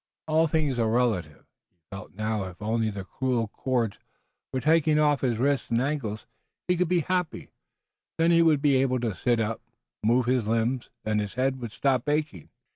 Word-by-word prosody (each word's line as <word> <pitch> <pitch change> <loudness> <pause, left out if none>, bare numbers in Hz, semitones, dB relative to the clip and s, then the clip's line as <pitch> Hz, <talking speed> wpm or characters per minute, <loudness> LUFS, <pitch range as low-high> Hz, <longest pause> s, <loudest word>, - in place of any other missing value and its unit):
All 160 +1 +3
things 150 -5 0
are 115 -1 +2
relative. 110 -10 0 0.2
He - - -46
felt 95 -1 -9
now 110 -1 -2
if 90 -1 -10
only 110 +1 0
the 100 -2 -6
cruel 120 +1 -1
cords 120 -3 -1 0.5
were 130 - -1
taken 155 +1 +3
off 150 -2 +3
his 120 -4 0
wrists 140 +3 0
and 115 0 +2
ankles 125 -6 -2 0.4
he 180 - +3
could 180 0 +1
be 180 -1 +3
happy. 180 0 -2 0.7
Then 165 +1 +3
he 170 0 +5
would 155 -3 +3
be 140 -3 +4
able 130 -1 +1
to 115 -4 -1
sit 120 +6 0
up, 110 0 -2 0.4
move 120 +3 +2
his 125 -3 +1
limbs, 115 +3 0 0.2
and 105 0 +1
his 105 0 -5
head 130 +1 0
would 120 -3 -5
stop 135 +2 0
aching. 145 - -2
125 Hz, 190 wpm, -26 LUFS, 110-145 Hz, 0.7 s, he